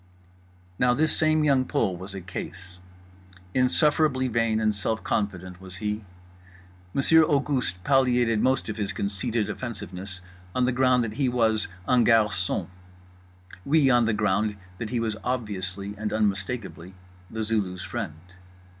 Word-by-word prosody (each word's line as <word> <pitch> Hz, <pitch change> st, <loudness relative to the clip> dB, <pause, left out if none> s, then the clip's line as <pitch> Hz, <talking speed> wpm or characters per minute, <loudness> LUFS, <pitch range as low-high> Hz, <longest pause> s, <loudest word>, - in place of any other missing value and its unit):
Now 125 Hz, 0 st, +4 dB
this 155 Hz, +3 st, +2 dB
same 155 Hz, 0 st, +3 dB
Young 135 Hz, -3 st, +3 dB
Pole 95 Hz, -7 st, 0 dB
was 95 Hz, +3 st, -9 dB
a 95 Hz, -, -5 dB
case. 90 Hz, +1 st, -8 dB, 0.7 s
Insufferably 130 Hz, +1 st, +3 dB
vain 115 Hz, -2 st, +1 dB
and 110 Hz, -1 st, +2 dB
self 110 Hz, +2 st, -2 dB
confident 95 Hz, -3 st, -3 dB
was 95 Hz, -1 st, -10 dB
he. 105 Hz, +3 st, -3 dB, 0.9 s
Monsieur 160 Hz, -, +5 dB
Auguste 140 Hz, -, +1 dB
palliated 125 Hz, -4 st, +3 dB
most 130 Hz, 0 st, +1 dB
of 110 Hz, -1 st, -4 dB
his 105 Hz, -1 st, -2 dB
conceited 100 Hz, +3 st, -1 dB
offensiveness 100 Hz, -4 st, -6 dB, 0.4 s
on 125 Hz, -, +3 dB
the 125 Hz, -, +2 dB
ground 125 Hz, -1 st, +3 dB
that 110 Hz, -2 st, -4 dB
he 130 Hz, -, +3 dB
was 110 Hz, -3 st, +2 dB, 0.2 s
un 125 Hz, -2 st, +4 dB
garçon; 105 Hz, -6 st, +3 dB, 1.0 s
we 140 Hz, 0 st, +4 dB
on 120 Hz, -2 st, +4 dB
the 110 Hz, -, +1 dB
ground 105 Hz, 0 st, +1 dB, 0.2 s
that 115 Hz, -, -4 dB
he 120 Hz, -, -1 dB
was 110 Hz, -2 st, -1 dB
obviously 100 Hz, -5 st, -3 dB
and 105 Hz, -1 st, -2 dB
unmistakably 100 Hz, -3 st, -2 dB, 0.3 s
The 110 Hz, 0 st, -3 dB
Zulu's 100 Hz, -5 st, -1 dB
friend. 75 Hz, -, -4 dB
110 Hz, 140 wpm, -26 LUFS, 100-125 Hz, 1.0 s, Monsieur